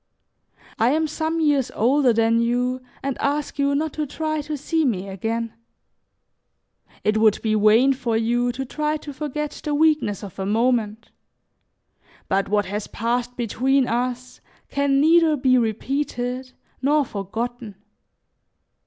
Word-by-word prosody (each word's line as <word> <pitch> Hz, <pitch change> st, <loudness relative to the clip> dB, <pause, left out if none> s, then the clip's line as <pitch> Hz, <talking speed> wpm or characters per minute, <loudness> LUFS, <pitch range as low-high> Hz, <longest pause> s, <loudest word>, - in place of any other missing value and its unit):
"I 235 Hz, +4 st, +3 dB
am 315 Hz, +1 st, +1 dB
some 315 Hz, +2 st, -2 dB
years 290 Hz, -5 st, +2 dB
older 255 Hz, +3 st, +3 dB
than 230 Hz, 0 st, +2 dB
you 245 Hz, +2 st, 0 dB, 0.2 s
and 275 Hz, -1 st, -3 dB
ask 290 Hz, 0 st, -1 dB
you 280 Hz, 0 st, +2 dB
not 310 Hz, +1 st, -1 dB
to 305 Hz, -1 st, -3 dB
try 310 Hz, +2 st, -2 dB
to 300 Hz, +1 st, -5 dB
see 320 Hz, +3 st, 0 dB
me 200 Hz, -8 st, -1 dB
again. 225 Hz, +4 st, -3 dB, 1.5 s
It 215 Hz, +1 st, +2 dB
would 215 Hz, -1 st, +4 dB
be 220 Hz, -1 st, +1 dB
vain 215 Hz, +6 st, +5 dB
for 235 Hz, -4 st, -1 dB
you 240 Hz, +2 st, +1 dB
to 265 Hz, +2 st, -4 dB
try 300 Hz, +3 st, -1 dB
to 295 Hz, -1 st, -9 dB
forget 300 Hz, +1 st, -4 dB
the 300 Hz, -2 st, -1 dB
weakness 300 Hz, -, +2 dB
of 200 Hz, -1 st, -9 dB
a 190 Hz, -, -2 dB
moment; 225 Hz, 0 st, 0 dB, 1.2 s
but 195 Hz, 0 st, 0 dB
what 205 Hz, 0 st, +2 dB
has 205 Hz, +2 st, -4 dB
passed 245 Hz, +2 st, -2 dB
between 255 Hz, +3 st, +1 dB
us 250 Hz, +1 st, -3 dB, 0.3 s
can 280 Hz, -1 st, +1 dB
neither 320 Hz, +1 st, +5 dB
be 255 Hz, -1 st, +3 dB
repeated 250 Hz, +2 st, -2 dB, 0.3 s
nor 290 Hz, +2 st, +3 dB
forgotten. 225 Hz, +2 st, -5 dB
250 Hz, 140 wpm, -23 LUFS, 225-290 Hz, 1.5 s, vain